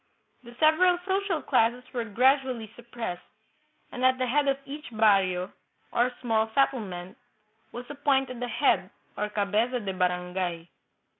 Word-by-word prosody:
The 240 -1 -14
several 350 +3 +5
social 385 -4 -1
classes 245 -1 +2
were 240 -2 -2
gradually 250 0 +1
suppressed, 235 -6 -6 0.7
and 250 - -5
at 260 0 +4
the 255 - 0
head 280 +3 +1
of 275 0 +2
each 295 +3 -8
barrio, 195 -5 +2 0.4
or 245 +1 +2
small 225 -2 +1
settlement, 210 -9 -1 0.5
was 245 +1 -7
appointed 270 -3 0
a 245 - -2
head, - - +1 0.3
or 210 - -2
cabeza 210 +5 0
de 200 -4 -4
barangay. 180 -2 -2
240 Hz, 135 wpm, -27 LUFS, 205-270 Hz, 0.7 s, several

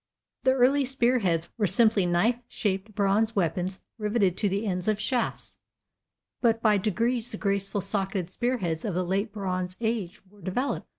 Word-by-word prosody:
The 260 - +5
early 265 +2 +4
spear 255 -1 +2
heads 170 -5 0
were 210 - +3
simply 200 0 +3
knife 205 +8 +2
shaped 200 0 -2
bronze 210 +2 +2
weapons 185 0 -1 0.2
riveted 210 -4 +1
to 205 - +1
the 200 +3 -1
ends 180 -2 -2
of 215 -1 +1
shafts, 240 +2 -2 0.8
but 230 -2 +3
by 215 -3 +3
degrees 230 +4 0
the 210 - -4
graceful 200 0 -1
socketed 195 -2 -1
spear 245 +5 0
heads 165 -6 -2
of 200 -5 -2
the 180 0 0
late 195 +4 -1
bronze 185 -3 -3
age 220 -6 -2
were 205 +1 -20
developed. 245 +10 -2
205 Hz, 170 wpm, -27 LUFS, 185-230 Hz, 0.8 s, The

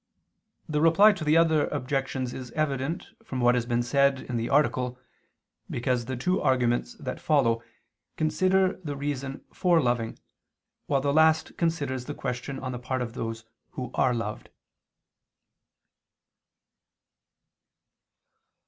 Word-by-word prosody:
The 150 -1 0
Reply 170 +7 +7
to 175 -5 -6
the 155 +1 +4
other 160 -2 +4
Objections 130 -2 -2
is 130 -1 -7
evident 150 +1 -1 0.2
from 130 - -5
what 120 0 +4
has 120 -1 0
been 120 0 +1
said 140 +2 +2
in 125 - -5
the 115 0 -1
article, 130 -3 +1 0.7
because 120 0 -1
the 130 +1 -4
two 180 +9 0
arguments 120 -2 +1
that 130 -4 -6
follow 115 -7 +2 0.6
consider 185 +4 +2
the 145 -3 -4
reason 140 -1 -4
for 175 -3 +3
loving, 120 -5 0 0.7
while 140 -2 +2
the 140 0 +1
last 160 +1 +3
considers 145 -7 -1
the 145 - -5
question 125 +1 -4
on 130 -1 -4
the 125 - -5
part 130 0 -2
of 115 -1 -6
those 115 -1 -5 0.3
who 130 -7 -5
are 125 -2 +2
loved. 110 -2 -5
135 Hz, 130 wpm, -27 LUFS, 125-155 Hz, 0.7 s, Reply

